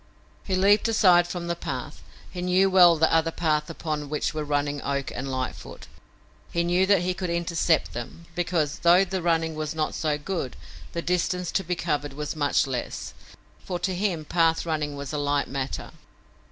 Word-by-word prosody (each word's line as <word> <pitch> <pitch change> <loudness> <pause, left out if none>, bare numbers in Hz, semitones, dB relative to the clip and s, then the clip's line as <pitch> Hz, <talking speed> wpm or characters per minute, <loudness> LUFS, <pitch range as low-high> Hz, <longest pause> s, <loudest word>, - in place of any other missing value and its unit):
He 190 - -1
leaped 200 +4 +4
aside 180 -6 +5
from 175 0 -5
the 170 0 -1
path. 140 -1 -6 0.3
He 180 - -5
knew 185 +2 +3
well 175 -3 +7
the 160 +1 +3
other 165 0 +3
path 155 -2 0
upon 155 -3 -4
which 150 0 -1
were 155 -1 -2
running 145 -1 -1
Oak 140 -1 -2
and 135 - -4
Lightfoot. 130 -1 -5 0.7
He 170 - +1
knew 175 +2 +2
that 195 -3 +4
he 180 +1 0
could 180 -1 -4
intercept 170 -1 +1
them, 120 +8 -7
because, 165 -4 -1
though 175 +3 +5
the 190 0 -3
running 165 -1 +1
was 155 0 -4
not 155 -1 -1
so 150 -2 -1
good, 150 -4 -4 0.4
the 170 - -3
distance 180 0 0
to 195 - 0
be 180 +1 -2
covered 150 -4 -2
was 150 +2 -4
much 145 -2 +2
less, 130 -3 -4 0.5
for 180 - -3
to 185 +2 -2
him 180 -4 -1
path 165 0 +2
running 155 -3 -2
was 140 0 -6
a 150 - -1
light 145 0 0
matter. 135 0 -4
165 Hz, 185 wpm, -26 LUFS, 150-180 Hz, 0.7 s, well